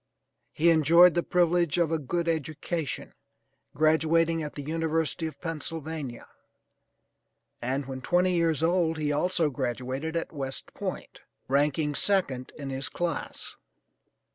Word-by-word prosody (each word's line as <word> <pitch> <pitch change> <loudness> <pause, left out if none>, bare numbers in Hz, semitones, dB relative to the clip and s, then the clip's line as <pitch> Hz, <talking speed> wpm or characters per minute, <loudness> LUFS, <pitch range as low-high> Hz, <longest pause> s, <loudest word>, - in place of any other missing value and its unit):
He 170 +2 +4
enjoyed 165 +3 +6
the 175 - +2
privilege 175 -3 +2
of 170 -2 +2
a 165 - +1
good 170 +4 -2
education, 160 -1 -3 0.6
graduating 160 +2 +3
at 150 -1 -6
the 145 - -5
University 160 +1 -1
of 155 - -9
Pennsylvania, 160 -5 -5 1.4
and 135 +3 -1
when 130 0 -6
twenty 180 +5 +2
years 165 -3 +1
old 165 -1 +2
he 150 -1 0
also 160 +1 +1
graduated 130 +5 -3
at 165 - -2
West 135 -3 -5
Point, - - -6 0.3
ranking 145 +2 +1
second 140 -8 0
in 140 -2 -5
his 135 +1 -2
class. 175 -2 -4
160 Hz, 125 wpm, -28 LUFS, 140-170 Hz, 1.4 s, enjoyed